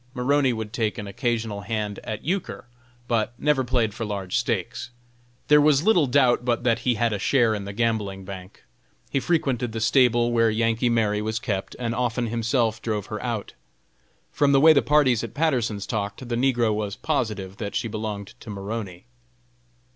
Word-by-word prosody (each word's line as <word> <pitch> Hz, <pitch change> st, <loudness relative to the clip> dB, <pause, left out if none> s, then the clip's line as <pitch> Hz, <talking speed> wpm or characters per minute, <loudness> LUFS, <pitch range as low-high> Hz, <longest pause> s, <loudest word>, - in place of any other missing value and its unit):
Maroney 135 Hz, +1 st, +2 dB
would 110 Hz, -2 st, -5 dB
take 110 Hz, -5 st, -1 dB
an 105 Hz, -, -5 dB
occasional 110 Hz, 0 st, -2 dB
hand 105 Hz, -1 st, -3 dB
at 110 Hz, -, -5 dB
euchre, 180 Hz, -3 st, -3 dB, 0.4 s
but 115 Hz, 0 st, 0 dB
never 150 Hz, -1 st, +2 dB
played 120 Hz, -4 st, 0 dB
for 115 Hz, -, -5 dB
large 100 Hz, -4 st, -4 dB
stakes. 120 Hz, +1 st, -2 dB, 0.6 s
There 150 Hz, 0 st, +6 dB
was 145 Hz, -1 st, +4 dB
little 175 Hz, -9 st, +4 dB
doubt 125 Hz, -2 st, +3 dB
but 120 Hz, -1 st, 0 dB
that 115 Hz, -2 st, +2 dB
he 120 Hz, 0 st, +1 dB
had 115 Hz, 0 st, +1 dB
a 100 Hz, -, -2 dB
share 120 Hz, 0 st, +3 dB
in 105 Hz, -2 st, -4 dB
the 100 Hz, -, -5 dB
gambling 100 Hz, -3 st, -1 dB
bank. 95 Hz, -1 st, -10 dB, 0.5 s
He 135 Hz, -, +1 dB
frequented 130 Hz, -7 st, 0 dB
the 110 Hz, -, -3 dB
stable 120 Hz, 0 st, +3 dB
where 115 Hz, -1 st, +3 dB
"Yankee 115 Hz, +2 st, +1 dB
Mary" 105 Hz, -3 st, +1 dB
was 110 Hz, +1 st, -2 dB
kept, 105 Hz, -5 st, -3 dB
and 120 Hz, -2 st, -2 dB
often 120 Hz, 0 st, -1 dB
himself 115 Hz, -1 st, 0 dB
drove 105 Hz, -3 st, -2 dB
her 105 Hz, -, -4 dB
out. 115 Hz, -4 st, -4 dB, 0.8 s
From 140 Hz, -1 st, +2 dB
the 135 Hz, -, +6 dB
way 160 Hz, +3 st, +8 dB
the 140 Hz, -, +4 dB
parties 135 Hz, -6 st, +3 dB
at 115 Hz, -, -7 dB
Patterson's 120 Hz, -10 st, 0 dB
talked, 105 Hz, +3 st, -4 dB
the 120 Hz, -, -2 dB
negro 120 Hz, -3 st, +2 dB
was 105 Hz, -2 st, -3 dB
positive 105 Hz, -10 st, -2 dB
that 100 Hz, -2 st, -5 dB
she -, -, -1 dB
belonged 105 Hz, -2 st, -5 dB
to 115 Hz, -, -11 dB
Maroney. 100 Hz, -2 st, -6 dB
115 Hz, 180 wpm, -24 LUFS, 105-125 Hz, 0.8 s, way